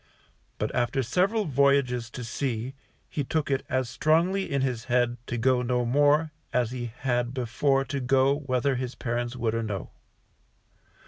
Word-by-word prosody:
But - - -2
after 125 +2 +1
several 195 - +1
voyages 140 -4 +2
to 125 - -7
sea, 120 +1 -3 0.3
he 145 - -3
took 150 +1 -1
it 135 - +1
as 130 -1 0
strongly 170 +9 +1
in 140 -1 +1
his 120 -3 -2
head 120 -1 +1
to 120 - -2
go 125 +2 +3
no 125 0 0
more 145 +5 +3 0.2
as 120 -2 +1
he 125 -1 -4
had 120 -1 0
before 135 +3 +1
to 140 +2 -3
go, 135 +2 +3
whether 135 -1 0
his 125 0 -4
parents 120 0 -2
would 115 -3 -1
or 115 - 0
no. 105 -5 -4
130 Hz, 160 wpm, -27 LUFS, 120-140 Hz, 0.3 s, go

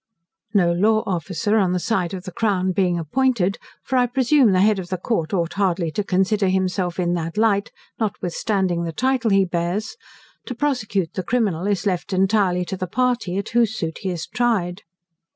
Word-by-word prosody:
No 175 -4 +4
law 215 +5 +2
officer 185 +3 -1
on 190 -4 +2
the 180 - 0
side 185 -3 -1
of 180 - -7
the 185 - -7
crown 190 -3 0
being 180 -1 +1
appointed, 195 - 0 0.2
(for 260 - -1
I 250 0 +3
presume 255 -1 +3
the 185 -1 +3
head 210 0 +3
of 180 -1 -7
the 185 - -2
court 170 -4 -2
ought 170 -3 -1
hardly 180 -4 0
to 210 - -2
consider 195 +2 +1
himself 185 -1 0
in 175 -1 +1
that 165 +1 -3
light, 210 -2 +2 0.3
notwithstanding 190 -3 -1
the 165 -1 -4
title 255 +2 +1
he 195 -1 +4
bears) 175 - -2 0.5
to 250 - -4
prosecute 225 - -1
the - - -2
criminal 200 -4 0
is 205 0 0
left 190 0 -1
entirely 190 -2 +2
to 190 - -5
the 185 - -3
party, 245 -4 0
at 200 - -3
whose 230 -2 +2
suit 160 -4 -4
he 190 - -3
is 175 -3 -4
tried. 205 -7 -1
190 Hz, 190 wpm, -22 LUFS, 180-220 Hz, 0.5 s, No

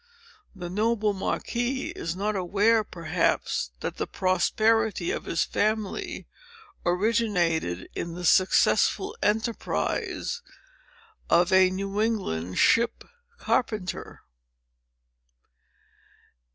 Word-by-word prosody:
The 175 -2 -6
noble 215 +1 +1
Marquis 240 +6 -2
is 165 +1 -4
not 205 +3 -1
aware, 205 +4 +2
perhaps, 170 - -1
that - - -4
the - - -2
prosperity 215 +1 +1
of - - -4
his 165 - 0
family 215 -1 -2 0.6
originated 175 - 0
in 170 0 -5
the 180 0 -5
successful 385 - +3
enterprise 225 - -1 0.9
of 175 +2 +4
a 190 0 +6
New 195 +2 -2
England 90 - -2
ship 235 0 +3 0.3
carpenter." 215 - -2
200 Hz, 85 wpm, -26 LUFS, 175-220 Hz, 0.9 s, a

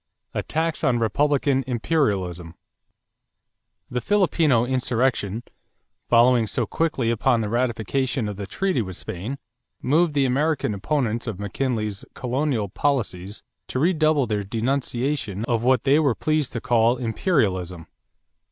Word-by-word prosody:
=Attacks 165 +1 -2
on 125 -2 +3
Republican 135 +4 +1
"Imperialism."= 100 - -1 1.4
The 125 - -1
Filipino 165 - +2
insurrection, 120 -4 0 0.7
following 120 -1 +5
so - - -1
quickly 145 -8 0
upon 115 +1 +2
the 105 - -2
ratification 120 +1 -1
of 105 - -4
the 100 0 -6
treaty 190 - 0
with 95 -4 -6
Spain, 110 +11 -5 0.4
moved 155 +3 +2
the 140 -1 +3
American 140 -2 +1
opponents 120 +2 -1
of 105 -4 -4
McKinley's 110 -1 -2
colonial 125 -3 -1
policies 100 -5 -2 0.2
to - - -4
redouble 155 -2 +3
their 105 -3 -1
denunciation 120 0 -2
of 120 -2 0
what 125 -1 +3
they 140 +2 +4
were 140 -7 +2
pleased 155 -3 0
to 115 - -3
call 120 +1 +3
"imperialism." 100 - -1
125 Hz, 125 wpm, -23 LUFS, 110-140 Hz, 1.4 s, following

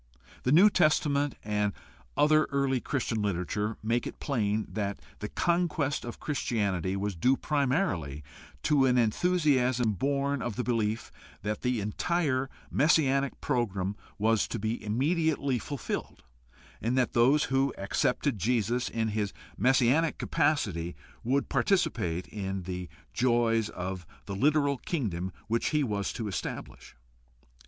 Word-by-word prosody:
The 125 - 0
New 190 +8 +7
Testament 145 -4 +2
and 105 -1 0 0.4
other 155 +1 +5
early 140 -2 0
Chris 130 0 -2
tian 110 -2 -1
literature 105 +2 -1
make 115 +2 0
it - - -8
plain 110 -6 0
that 100 -2 -3 0.2
the 105 - -4
conquest 170 -5 0
of 120 - -7
Christianity 100 - -1
was 100 0 -2
due 130 +11 +3
primarily 130 - 0 0.4
to 140 -3 +4
an 125 -1 +3
enthusiasm 125 -3 +2
born 140 +5 0
of 120 -4 -3
the 125 - -1
belief 115 -3 -1 0.3
that 105 +1 -2
the 125 -2 0
entire 135 - 0 0.2
messianic 140 -3 +3
program 100 -5 -1 0.2
was 110 0 +2
to - - -3
be 110 +2 -2
immediately 140 +3 +1
fulfilled 140 +1 -5 0.6
and 120 +3 0
that 125 -2 +2
those 130 +6 +4
who 135 +1 +3
accepted 115 +5 0
Jesus 120 +3 +1
in 110 -1 -1
his 105 -2 -2 0.2
messianic 130 - +3
capacity 95 - 0 0.3
would 135 +4 +1
participate 115 - +1
in 95 -2 -4
the 90 0 -5 0.2
joys 120 -3 +2
of 90 -1 -5 0.2
the 100 - -5
literal 145 +3 +2
kingdom 95 - -2 0.2
which 115 +1 0
he 150 -1 +2
was 105 -5 -1
to 110 - -4
establish. 95 - -6
120 Hz, 130 wpm, -29 LUFS, 105-140 Hz, 0.6 s, New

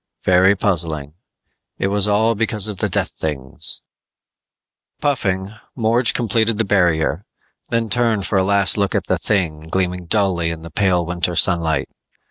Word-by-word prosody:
Very 95 +2 +4
puzzling. 80 -8 0 0.6
But - - -5
it - - +2
was 100 0 +3
all 110 +2 +2
because 110 -1 +1
of 105 -2 -6
the - - -1
death - - -1
things! 70 -4 -3 1.2
Puffing, 100 -9 -1 0.2
Morge 115 0 +2
completed 115 -1 0
the 115 - 0
barrier, 90 -3 +1 0.5
then 115 -1 0
turned 110 -2 0
for 95 +2 +1
a - - +2
last 100 0 +3
look 100 -2 0
at - - -1
the - - -1
'thing 90 -7 -1
gleaming 90 -1 -2
dully 95 -5 0
in 80 -1 -6
the 85 - -10
pale 90 0 +1
winter 90 +1 -2
sunlight. 85 -4 +2
95 Hz, 155 wpm, -19 LUFS, 85-105 Hz, 1.2 s, Very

